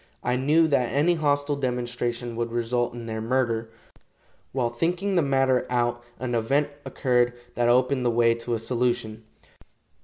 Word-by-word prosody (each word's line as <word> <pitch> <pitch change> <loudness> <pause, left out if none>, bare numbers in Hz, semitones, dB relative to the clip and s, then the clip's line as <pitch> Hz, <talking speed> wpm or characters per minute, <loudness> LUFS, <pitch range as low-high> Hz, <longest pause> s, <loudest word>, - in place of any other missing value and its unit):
I 125 +1 +1
knew 150 +6 +3
that 130 -5 +1
any 150 +7 +3
hostile 145 -2 +1
demonstration 120 -2 -2
would 115 0 -2
result 120 +1 -1
in 120 -1 -7
their 110 -1 -4
murder. 115 -1 0 0.8
While 125 -3 -1
thinking 180 +10 -1
the 175 - +4
matter 135 -3 +2
out 120 -1 0
an 125 -1 -3
event 135 +6 +1 0.2
occurred 125 -2 +1 0.2
that 120 0 +1
opened 130 +1 +3
the 120 - +2
way 115 0 +3
to 115 +1 -3
a - - -1
solution. 115 -1 -2
125 Hz, 155 wpm, -25 LUFS, 120-135 Hz, 0.8 s, the